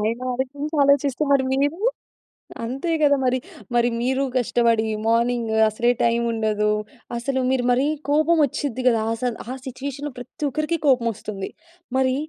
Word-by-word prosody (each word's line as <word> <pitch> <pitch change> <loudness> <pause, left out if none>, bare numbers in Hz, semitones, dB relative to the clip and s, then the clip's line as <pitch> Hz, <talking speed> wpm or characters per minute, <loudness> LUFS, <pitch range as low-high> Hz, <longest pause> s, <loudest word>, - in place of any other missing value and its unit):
ఆయనాలోచించాలోచిస్తే 275 +5 0
మరి 275 -1 +4
మీరు? 285 +6 0 0.8
అంతే 270 +8 -3
గదా 285 -1 +5
మరి! 255 0 +2 0.4
మరి 240 0 +4
మీరు 260 +2 +1
కష్టబడి 230 -2 +2 0.2
మార్నింగు 230 -1 +1
అసలే 235 +3 +2
టైముండదు. 225 -3 +1 0.5
అసలు 260 +2 -1
మీరు 260 -2 +1
మరీ 260 +4 +2 0.2
కోపమొచ్చుద్ది 295 -4 +2
గదాసల, 230 +1 +1 0.2
ఆ - - -2
సిట్యుయేషన్‌లో 280 +3 -5
ప్రత్తొకరికి 300 +6 -2
కోపమొస్తుంది. 225 -6 0 0.5
మరీ 260 0 +2
255 Hz, 105 wpm, -23 LUFS, 230-280 Hz, 0.8 s, గదా